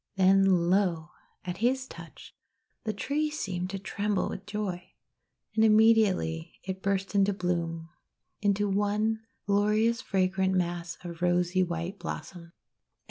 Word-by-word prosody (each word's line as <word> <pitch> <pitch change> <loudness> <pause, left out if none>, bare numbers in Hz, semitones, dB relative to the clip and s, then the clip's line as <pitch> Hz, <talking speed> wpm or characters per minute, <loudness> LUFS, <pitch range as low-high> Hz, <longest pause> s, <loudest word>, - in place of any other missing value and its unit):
Then, 190 -2 +4
lo! 175 -4 +1 0.3
at 180 0 -4
his 260 +4 +1
touch, - - -12 0.5
the 215 - 0
tree 290 +8 -1
seemed 185 -12 -3
to 195 - -4
tremble 200 0 -1
with 195 - -7
joy. 190 -4 -4 0.6
And 220 - +3
immediately 215 - +3
it 190 0 -5
burst 195 0 -1
into 200 0 +3
bloom, 170 -3 -2 0.3
— - - -52
into 205 0 +2
one 210 +2 0 0.2
glorious 210 +4 +2
fragrant 190 -3 +1
mass 175 -1 -2
of 170 -1 -8
rosy 180 +1 +2
white 175 +2 -3
blossoms. 175 0 -7
195 Hz, 130 wpm, -28 LUFS, 175-210 Hz, 0.6 s, Then